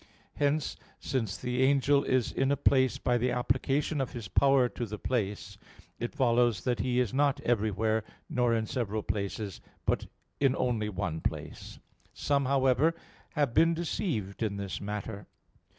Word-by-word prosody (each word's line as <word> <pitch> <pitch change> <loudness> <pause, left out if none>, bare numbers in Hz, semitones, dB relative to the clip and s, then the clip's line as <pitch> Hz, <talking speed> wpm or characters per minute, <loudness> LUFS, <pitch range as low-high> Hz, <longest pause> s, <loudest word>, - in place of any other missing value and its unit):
Hence, 145 +1 0 0.2
since 110 -7 -2
the 125 +1 -2
angel 140 +1 +4
is 130 -3 +1
in 135 +1 +1
a 140 - +2
place 130 -3 +3
by 120 -1 +1
the 125 +2 +1
application 135 +4 0
of 130 - -3
his 115 -4 -6
power 135 +2 +4
to 120 0 -5
the 105 +1 -5
place, 105 -4 -3 0.4
it 120 +4 -4
follows 120 -6 +2
that 125 -1 0
he 125 -1 +1
is 125 -3 0
not 140 0 +2
everywhere, 110 -2 +1 0.2
nor 125 -1 +1
in 110 -1 0
several 110 -2 -2
places, 100 0 -3 0.2
but - - 0 0.3
in 135 -2 +3
only 115 -5 0
one 90 -5 -3
place. - - -5 0.4
Some, 140 -1 +1
however, 135 +4 +3 0.4
have 145 -6 +1
been 165 +3 +4
deceived 140 - -3
in 105 -3 -1
this 100 -1 -4
matter. 105 0 -5
125 Hz, 155 wpm, -30 LUFS, 110-135 Hz, 0.4 s, angel